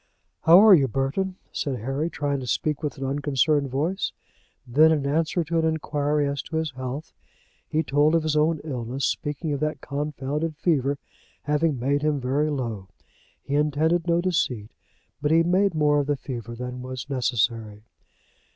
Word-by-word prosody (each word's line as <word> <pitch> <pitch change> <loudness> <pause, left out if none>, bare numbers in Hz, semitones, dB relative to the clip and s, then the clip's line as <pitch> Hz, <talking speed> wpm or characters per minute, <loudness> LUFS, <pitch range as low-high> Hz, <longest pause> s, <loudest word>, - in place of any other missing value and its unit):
"How 170 +3 +9
are 215 - +9
you, 140 -7 +5
Burton?" 135 - -1 0.2
said 135 -3 -2
Harry, 135 +7 -2
trying 145 -3 -2
to 130 - -7
speak 150 +3 -1
with 150 -3 -3
an 135 - -4
unconcerned 145 +1 +1
voice. 160 +9 -1 0.5
Then 150 +6 +5
in 150 -3 +1
answer 160 +4 +1
to 165 +1 -1
an 160 - +1
inquiry 150 -2 0
as 140 -1 -2
to 160 - -8
his 160 -1 -1
health, 130 +3 -6 0.5
he 160 +1 0
told 145 +2 +3
of 165 - +2
his 155 -1 0
own 155 +1 +2
illness, 130 -2 -3
speaking 150 +1 -2
of 140 - -2
that 155 +1 -2
confounded 150 +2 -3
fever 145 -5 +1 0.5
having 150 -1 +1
made 140 +4 +1
him 150 -1 +1
very 135 +4 0
low. 115 -9 -3 0.6
He 140 - -5
intended 155 +4 +1
no 170 0 +3
deceit, 155 - -1 0.5
but 145 - +1
he 165 +1 +5
made 185 +1 +2
more 150 -1 +3
of 145 - -1
the 145 -1 0
fever 120 -3 -6
than 125 +1 -6
was 130 0 -6
necessary. 115 -5 -1
145 Hz, 170 wpm, -25 LUFS, 135-160 Hz, 0.6 s, How